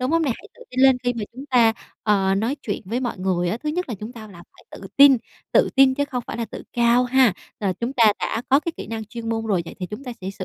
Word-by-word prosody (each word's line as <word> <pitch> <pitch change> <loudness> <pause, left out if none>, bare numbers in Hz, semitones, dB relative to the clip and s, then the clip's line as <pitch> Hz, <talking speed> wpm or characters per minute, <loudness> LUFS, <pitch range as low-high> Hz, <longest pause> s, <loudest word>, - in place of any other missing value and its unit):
đúng 255 +3 -1
không 330 0 +2
nè, 280 - +1
hãy - - -15
tự - - -14
tin 255 +1 -2
lên 265 -1 +6
khi 245 - +2
mà 225 -3 -4
chúng 260 +3 -9
ta, 240 -5 +4 0.3
ờ, 195 -2 +2
nói 225 +7 0
chuyện 205 - -4
với 230 +6 -2
mọi 245 -6 -3
người 180 -2 0
á, 215 - -1
thứ 300 +5 -5
nhất 355 +2 -2
là 235 - -3
chúng 220 +3 -7
ta 235 - -11
là 175 -3 -13
phải - - -21
tự 195 - -10
tin, 280 -2 +8 0.4
tự - - +4
tin 265 -1 +6
chứ 285 +1 0
không 250 -4 -4
phải - - -5
là 235 - -2
tự 220 - -9
cao 240 +1 +3
ha. 255 -3 +4 0.3
Rồi, 195 -3 0
chúng 240 +3 -2
ta 225 -5 +5
đã 230 - -2
có 275 +2 +5
cái 335 +1 -4
kỹ - - -7
năng 220 0 -5
chuyên 225 +1 -7
môn 225 0 -2
rồi, 190 -5 +1
vậy - - -9
thì 180 - -3
chúng 210 +9 -8
ta 250 - -5
sẽ 190 +1 -4
sử 195 -1 -7
235 Hz, 305 wpm, -22 LUFS, 210-260 Hz, 0.4 s, tin